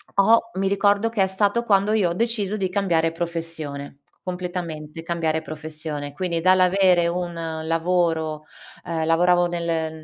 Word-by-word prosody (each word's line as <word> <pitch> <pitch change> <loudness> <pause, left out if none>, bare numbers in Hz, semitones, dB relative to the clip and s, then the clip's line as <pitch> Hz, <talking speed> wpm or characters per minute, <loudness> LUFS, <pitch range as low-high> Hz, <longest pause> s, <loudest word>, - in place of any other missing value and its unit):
ho 230 +3 +4
mi 195 +1 0
ricordo 200 +2 +2
che 220 -4 -1
è - - +1
stato 205 +4 +1
quando 205 -1 +2
io 195 -6 +2
ho - - -2
deciso 215 -1 -1
di 190 -2 -1
cambiare 175 -4 +1
professione, 165 -5 -5 0.2
completamente 175 -4 -5
cambiare 165 -2 -1
professione. 155 -2 -6
Quindi 170 -1 -2
dall'avere 185 -1 +4
un 175 0 -2 0.3
lavoro 165 -2 0 0.4
uhm, 160 -1 -2
lavoravo 175 +2 +3
nel 165 -2 -2
175 Hz, 135 wpm, -23 LUFS, 160-195 Hz, 0.4 s, ho